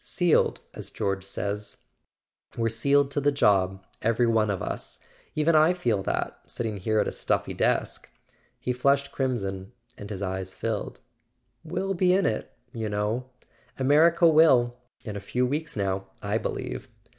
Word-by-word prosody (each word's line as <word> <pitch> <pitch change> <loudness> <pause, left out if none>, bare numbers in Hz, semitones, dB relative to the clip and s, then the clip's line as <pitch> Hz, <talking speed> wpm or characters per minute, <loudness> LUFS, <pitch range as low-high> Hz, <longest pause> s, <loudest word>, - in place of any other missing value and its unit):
"Sealed, 175 -3 +2
as - - -6
George 100 -1 -2
says—we're 105 +3 -6
sealed 140 +5 +2
to 145 - 0
the 145 +1 +3
job, 95 -7 +2 0.2
every 115 +2 +2
one 110 -2 +2
of 100 -2 -1
us! - - -4 0.4
Even 155 +2 +3
I 155 +3 +6
feel 120 - 0
that, - - -2
sitting 110 -3 -3
here 110 +3 0
at - - +1
a - - -1
stuffy - - -1
desk.. - - 0 0.3
." - - -39
He 125 - -1
flushed 140 +2 +2
crimson 100 -6 -2 0.3
and 100 - -8
his 100 -2 -4
eyes 95 0 -4
filled. 110 -2 -3 0.6
"We'll 195 0 -2
be 180 0 +3
in 195 - +2
it, 110 - -1 0.2
you 110 -3 -3
know; 105 +5 -2 0.5
America 155 +6 +5
will—in 125 -8 +3
a - - -3
few 125 +6 -1
weeks 150 +4 -2
now, 95 -2 -1
I 100 +2 -1
believe - - -4
115 Hz, 155 wpm, -26 LUFS, 100-140 Hz, 0.6 s, I